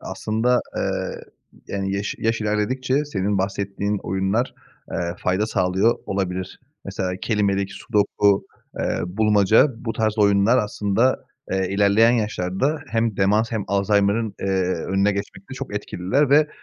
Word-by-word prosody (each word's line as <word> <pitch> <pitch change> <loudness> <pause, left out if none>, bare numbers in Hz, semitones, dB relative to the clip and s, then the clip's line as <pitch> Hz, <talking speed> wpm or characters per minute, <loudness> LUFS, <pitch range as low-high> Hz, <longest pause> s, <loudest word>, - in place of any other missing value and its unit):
Aslında, 120 +3 0 0.2
eee, - - -2 0.5
yani, 95 0 -2
yaş 100 +1 -3
yaş 115 0 0
ilerledikçe 130 +7 0
senin 100 -6 -1
bahsettiğin 100 +1 -2
oyunlar, 95 +6 -1 0.4
eee, 85 0 -2
fayda 95 +4 0
sağlıyor 95 +4 +1
olabilir. 95 -2 -3 0.2
Mesela, 90 -1 -3
kelimelik, 100 -3 0
sudoku, 100 -1 +1 0.3
eee, - - -1
bulmaca, 105 +5 +4 0.2
bu 115 - -1
tarz 110 -1 -1
oyunlar 100 +4 +4
aslında, 105 +3 0 0.3
eee, 95 -1 0
ilerleyen 105 +4 +4
yaşlarda 110 - -1
hem 115 -3 0
demans 105 +4 +2
hem 110 -3 -1
Alzaymır'ın, 100 +2 +1
eee, 95 -1 0
önüne 100 +2 +1
geçmekte 100 0 -6
çok - - -6
etkililer 130 +11 0
ve, 150 +1 +5
100 Hz, 125 wpm, -22 LUFS, 95-115 Hz, 0.5 s, ve